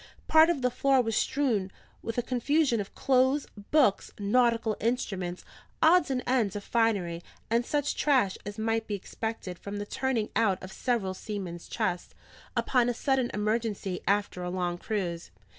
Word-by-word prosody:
Part 315 +1 +7
of 300 -7 0
the 250 - +2
floor 270 +1 +3
was 225 -1 -1
strewn 235 -10 0 0.3
with 230 +1 -5
a 245 - +1
confusion 255 0 +1
of 195 - -9
clothes, 265 +2 +2 0.2
books, 265 -10 +3
nautical 230 +1 +2
instruments, 195 -7 -2 0.3
odds 335 0 +5
and 255 -2 -1
ends 235 -6 +1
of 205 - -4
finery, 200 -8 0 0.3
and 235 +1 +3
such 290 +3 -1
trash 255 -10 +2
as 205 +1 -7
might 225 0 -1
be 210 - -2
expected 200 -2 -5
from 200 0 -6
the 205 - -4
turning 245 -1 -1
out 200 -5 +3
of 185 - -8
several 225 -7 -1
seamen's 185 -4 -6
chests, 175 0 -2 0.4
upon 245 -2 +2
a 240 - -1
sudden 265 -1 +1
emergency 210 -3 -1
and 200 - +6
after 200 -3 -7
a 180 - -3
long 175 -1 -2
cruise. 175 -6 -3
225 Hz, 165 wpm, -28 LUFS, 195-255 Hz, 0.4 s, Part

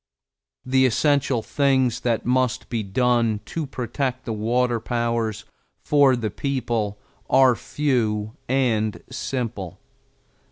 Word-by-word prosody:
The 130 0 +4
essential 130 -1 +1
things 130 -4 +1
that 115 -2 -1
must 125 -1 0
be 115 -2 -1
done 115 +1 +1
to 160 -3 -4
protect 130 0 -3
the 115 - -2
water 120 +2 +1
powers 115 -2 -2 0.4
for 140 -3 +4
the 110 -4 -3
people 120 -7 -2 0.3
are 130 -1 +6
few 110 -7 -1
and 115 -5 +1
simple. 120 -9 -4
120 Hz, 110 wpm, -23 LUFS, 110-130 Hz, 0.4 s, are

